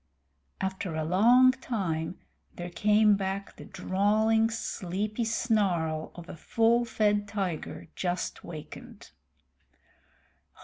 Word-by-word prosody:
After 190 -3 -3
a 160 - -1
long 235 +10 +6
time 185 -11 -3 0.4
there 175 0 -6
came 210 +2 +4
back 195 0 -4
the - - -11
drawling, 215 +4 +2
sleepy 210 0 -3
snarl 195 -9 0
of 175 -1 -10
a - - -8
full 230 +7 +2
fed 210 -2 +1
tiger 190 -8 -4
just 180 -1 -3
wakened. 155 -3 -10
200 Hz, 100 wpm, -28 LUFS, 175-220 Hz, 0.4 s, long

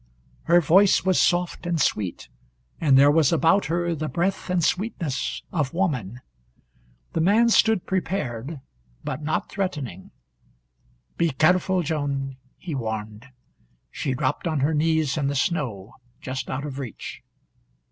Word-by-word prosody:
Her 175 +1 +5
voice 190 +5 +4
was 185 -1 +3
soft 175 0 0
and 170 -2 0
sweet, 100 - -1 0.5
and 140 -5 +4
there 140 +2 +7
was 155 -2 +3
about 165 +4 +3
her 170 +1 0
the 155 -1 -3
breath 190 +2 -1
and 180 -2 +1
sweetness 170 - -2
of 155 -5 -1
woman. 125 - -1 0.9
The 165 - 0
man 215 +7 +4
stood 220 -4 +3
prepared, 150 - -3 0.4
but - - -4
not 155 +1 -2
threatening. 145 - -4 1.1
"Be 170 - +2
careful, 180 +5 +2
Joan," 140 -3 -2 0.2
he 170 - -6
warned. 110 -2 -5 0.6
She 135 -2 -2
dropped 130 +4 -1
on 155 -4 0
her 150 +4 +2
knees 155 -1 +1
in 140 -2 0
the 140 - -1
snow, 130 - -2 0.3
just 130 0 -5
out 135 +2 -3
of 140 -2 -6
reach. 130 -5 -7
155 Hz, 135 wpm, -24 LUFS, 135-175 Hz, 1.1 s, there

